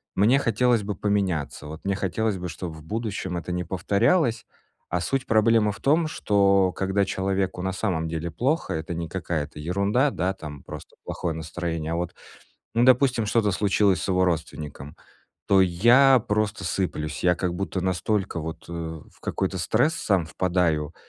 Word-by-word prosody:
мне 120 +8 +4
хотелось 120 -1 +2
бы 100 0 -3
поменяться. 95 -8 -1
Вот 80 +4 -9
мне 100 0 +1
хотелось 100 +2 -1
бы, 90 0 -5
чтоб 85 +1 -6
в 80 - -12
будущем 100 -2 -3
это 85 +1 -5
не 90 0 -1
повторялось. 110 - +1 0.4
А 90 -1 -1
суть 135 +6 -1
проблемы 110 -1 +4
в 100 - -10
том, 155 +3 +3
что, 100 - +3
когда 95 +1 0
человеку 95 -1 -1
на 95 - 0
самом 90 -6 -1
деле 80 +1 -3
плохо, 135 - 0
это 80 +2 -4
не 85 -1 -4
какая-то 80 -5 -3
ерунда, 100 - +1
да, 95 -4 -1
там 75 -4 -9
просто - - -10
плохое 85 -2 -3
настроение, 80 0 -4
а - - 0
вот, 85 0 -3 0.6
ну, 120 - +4
допустим, 125 -3 +4
что-то 105 -2 +2
случилось 100 -1 +2
с - - -3
его 95 0 +3
родственником, 75 -4 -4 0.5
то 95 - +6
я 120 +8 +5
просто 105 -1 0
сыплюсь, 80 -5 -2
я 90 0 +4
как 90 0 -2
будто 95 0 -3
настолько 95 0 -1
вот, 80 0 -6
э, 85 - -6
в 80 -2 -7
какой-то 95 0 -2
стресс 120 - +2
сам 95 -5 +1
впадаю, 85 -3 0
95 Hz, 170 wpm, -25 LUFS, 85-105 Hz, 0.6 s, то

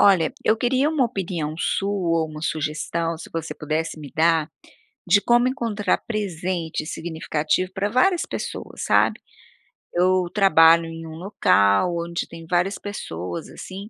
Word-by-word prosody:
Olha, 195 +2 +5
eu 220 - +4
queria 255 +5 +2
uma 310 -5 +2
opinião 180 -9 -3
sua 180 -4 0
ou - - -2
uma 155 0 -8
sugestão, 160 +2 -2
se 160 - -11
você 165 -1 -4
pudesse 155 +1 -3
me 145 -2 -9
dar, 160 -1 +2 0.6
de 195 +3 +5
como 240 +4 +3
encontrar 230 -6 0
presente 180 -7 -3
significativo 160 +2 -2
pra 200 +1 0
várias 345 - +3
pessoas, - - -6
sabe. - - +3 0.7
Eu 185 +1 +3
trabalho 170 -5 +6
em 165 0 -8
um 160 - -8
local 170 - +2
onde 170 0 -3
tem 165 -1 -10
várias 180 +3 +1
pessoas 160 - -6
assim. 195 +3 -9
170 Hz, 145 wpm, -23 LUFS, 160-200 Hz, 0.7 s, trabalho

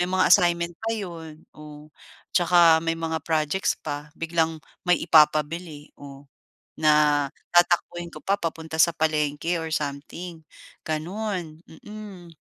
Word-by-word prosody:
May 175 - 0
mga 185 0 +2
assignment 175 -2 +3
pa 225 0 -2
'yon, 165 -6 -8
oh. 150 0 -12 0.4
'Tsaka 170 -2 +5
may 165 0 0
mga 160 -1 -3
projects 160 +3 0
pa, 145 +1 -6
biglang 165 -1 -1 0.3
may 180 0 +4
ipapabili, 155 0 +2
oh, 140 0 -12 0.5
na 150 -2 +3 0.3
tatakbuhin 175 0 +2
ko 155 - -10
pa 200 +1 +1
papunta 160 -1 -5
sa 170 +1 +5
palengke 155 +1 0
or 160 - -5
something, 155 +4 -5 0.5
gano'n, 170 0 -4
mm. 190 -1 -11
165 Hz, 125 wpm, -24 LUFS, 150-175 Hz, 0.5 s, Tsaka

